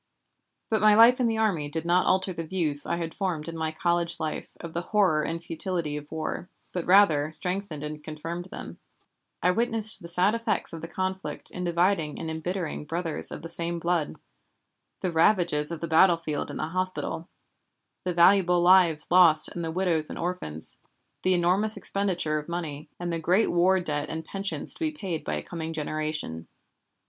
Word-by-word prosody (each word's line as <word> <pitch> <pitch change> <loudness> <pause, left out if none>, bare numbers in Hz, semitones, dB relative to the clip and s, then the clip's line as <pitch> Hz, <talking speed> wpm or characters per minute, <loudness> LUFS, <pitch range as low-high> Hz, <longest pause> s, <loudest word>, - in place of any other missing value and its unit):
But 220 -2 0
my 215 0 +6
life 235 +3 +7
in 245 - +3
the 225 -1 0
army 185 -10 0
did 160 +2 -3
not 175 +2 +3
alter 185 0 +2
the 165 - -4
views 155 -4 -1
I - - 0
had 165 -1 -4
formed 175 -6 -2
in 165 - -5
my 160 -1 -1
college 170 +1 -1
life 155 -1 -3
of 170 -1 -8
the 170 - -1
horror 185 -5 +2
and 165 +2 -3
futility 165 -2 -3
of 150 0 -8
war, 160 +3 -4 0.2
but 180 -2 -4
rather 165 -6 +5
strengthened 180 -3 -2
and 150 0 -6
confirmed 165 +3 -6
them. 190 - -9 0.6
I 180 - +5
witnessed 225 +1 0
the 170 - -8
sad 180 +4 +2
effects 230 -6 -1
of 165 - -6
the 165 - -6
conflict 190 +2 -4
in 180 - -5
dividing 170 -2 +1
and 160 -1 -4
embittering 160 -1 -4
brothers 165 +1 -1
of - - -7
the - - -5
same 170 +1 -2
blood, 170 -2 -1 0.9
the 185 - -1
ravages 165 -3 +4
of 170 - -5
the 170 - -2
battlefield 165 -2 +3
and - - -6
the 155 - -3
hospital, 185 -1 -3 0.7
the 180 - -1
valuable 175 0 +5
lives 175 -4 +4
lost 170 -4 +6
and 170 - -5
the 165 - -2
widows 165 -3 0
and - - -6
orphans, 165 - -4 0.4
the 185 0 +2
enormous 185 +5 +2
expenditure 180 -6 -1
of 150 - -10
money, 155 -3 -5
and 175 -1 -3
the 165 - -2
great 180 +7 +2
war 185 +2 +3
debt 150 -4 -2
and 160 0 -5
pensions 195 -4 -2
to - - -11
be 320 -2 0
paid 190 - -5
by 75 - -2
a 75 - -4
coming 165 -1 -5
generation. 155 - -4
170 Hz, 185 wpm, -27 LUFS, 160-185 Hz, 0.9 s, life